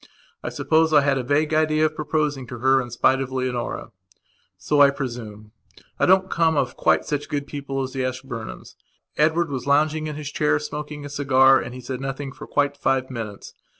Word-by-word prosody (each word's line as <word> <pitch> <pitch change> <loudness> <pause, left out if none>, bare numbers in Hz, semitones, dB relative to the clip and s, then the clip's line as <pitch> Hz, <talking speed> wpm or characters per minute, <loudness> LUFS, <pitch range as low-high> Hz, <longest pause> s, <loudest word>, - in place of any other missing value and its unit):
I - - -4
suppose 160 0 +2
I 150 - +7
had 140 -1 +1
a - - -3
vague 150 +4 +1
idea 155 0 +3
of 155 0 -1
proposing 150 -4 -1
to 120 - -7
her 130 +2 +3
in 120 - -7
spite 130 +3 +2
of 130 -1 -4
Leonora. 130 -2 -3 0.7
So, 150 -1 +1
I 140 - +8
presume, 115 -6 -6 0.5
I - - +3
don't 190 +1 +5
come 165 -4 +1
of - - 0
quite - - +2
such 145 -1 -3
good 145 -1 -2
people 135 -2 -4
as 130 - -6
the 135 - -2
Ashburnhams. 130 -3 -6 0.4
Edward 160 +1 +2
was 130 -1 -4
lounging 155 +2 +2
in 150 - -5
his 150 -1 -6
chair 150 0 +2
smoking 150 0 -6
a - - -5
cigar 135 -2 +4
and 125 - -6
he 130 - -8
said 130 +1 -5
nothing 135 0 -4
for - - -11
quite 145 0 +1
five 135 -2 0
minutes. 110 -5 -7
140 Hz, 200 wpm, -23 LUFS, 130-150 Hz, 0.7 s, I